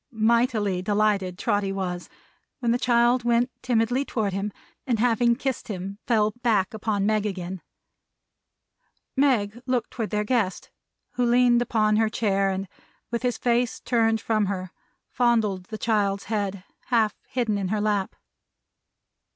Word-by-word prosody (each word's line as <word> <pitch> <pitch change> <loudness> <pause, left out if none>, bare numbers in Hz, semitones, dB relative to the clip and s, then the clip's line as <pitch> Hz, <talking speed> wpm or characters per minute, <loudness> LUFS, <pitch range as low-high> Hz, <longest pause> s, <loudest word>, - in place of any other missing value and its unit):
Mightily 220 -4 +1
delighted 205 -2 +1
Trotty 200 0 0
was, 180 -2 -4 0.5
when 240 -3 0
the 240 - +1
child 240 0 +3
went 240 +1 +2
timidly 245 +2 +1
toward 215 -7 -2
him, 195 +2 -2 0.4
and 240 -3 +1
having 235 +1 +3
kissed 265 0 -3
him, 195 0 -5
fell 215 -3 +3
back 215 -6 +1
upon 210 -2 -1
Meg 215 -1 +2
again. 185 -2 -5 1.5
Meg 240 -5 +1
looked 255 -2 0
toward 225 -4 -3
their 210 0 0
guest, 210 -5 -1 0.4
who 245 - -1
leaned 240 0 +4
upon 215 -3 +2
her 220 0 +3
chair, 195 -3 +1
and 190 0 -3 0.4
with 235 - -1
his 245 -1 0
face 240 0 +1
turned 225 -2 +1
from 215 -3 0
her, 185 -2 -4 0.4
fondled 220 -6 +1
the 215 - -7
child's 205 -3 0
head, 200 -3 -3 0.2
half 225 -4 +2
hidden 225 -5 -1
in 195 - -2
her 210 +3 -1
lap. 205 -2 0
215 Hz, 145 wpm, -25 LUFS, 200-240 Hz, 1.5 s, leaned